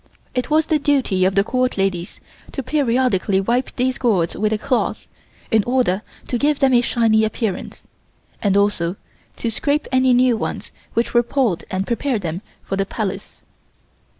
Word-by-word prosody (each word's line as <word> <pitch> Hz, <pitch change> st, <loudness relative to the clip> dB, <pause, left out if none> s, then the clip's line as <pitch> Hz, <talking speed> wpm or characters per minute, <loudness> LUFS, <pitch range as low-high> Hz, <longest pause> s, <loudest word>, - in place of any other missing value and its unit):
It 250 Hz, -1 st, -2 dB
was 310 Hz, +1 st, +3 dB
the 315 Hz, -2 st, +1 dB
duty 265 Hz, -11 st, +2 dB
of 190 Hz, 0 st, +1 dB
the 195 Hz, -, +4 dB
Court 255 Hz, +2 st, 0 dB
ladies 190 Hz, -3 st, -1 dB, 0.3 s
to 270 Hz, -, -3 dB
periodically 250 Hz, -8 st, +1 dB
wipe 240 Hz, +6 st, -1 dB
these 255 Hz, +1 st, 0 dB
gourds 190 Hz, -9 st, +1 dB
with 215 Hz, +1 st, 0 dB
a 220 Hz, -, +1 dB
cloth, 250 Hz, +4 st, -1 dB, 0.4 s
in 220 Hz, -3 st, +4 dB
order 240 Hz, -6 st, +1 dB, 0.3 s
to 245 Hz, -, -1 dB
give 295 Hz, +2 st, +2 dB
them 270 Hz, -2 st, +3 dB
a 240 Hz, -, +6 dB
shiny 225 Hz, -3 st, +2 dB
appearance, 220 Hz, -2 st, -3 dB, 0.6 s
and 200 Hz, -1 st, +2 dB
also 200 Hz, -4 st, +1 dB, 0.4 s
to 230 Hz, -, -2 dB
scrape 290 Hz, +6 st, 0 dB
any 260 Hz, -1 st, +4 dB
new 250 Hz, -1 st, +4 dB
ones -, -, -4 dB, 0.2 s
which 230 Hz, -, 0 dB
were 240 Hz, -, +5 dB
pulled 240 Hz, -7 st, 0 dB
and 190 Hz, +1 st, -2 dB
prepare 245 Hz, +2 st, -1 dB
them 175 Hz, -2 st, -4 dB, 0.2 s
for 195 Hz, -, -3 dB
the 195 Hz, -, +1 dB
Palace. 200 Hz, -3 st, -5 dB
230 Hz, 170 wpm, -20 LUFS, 195-255 Hz, 0.6 s, a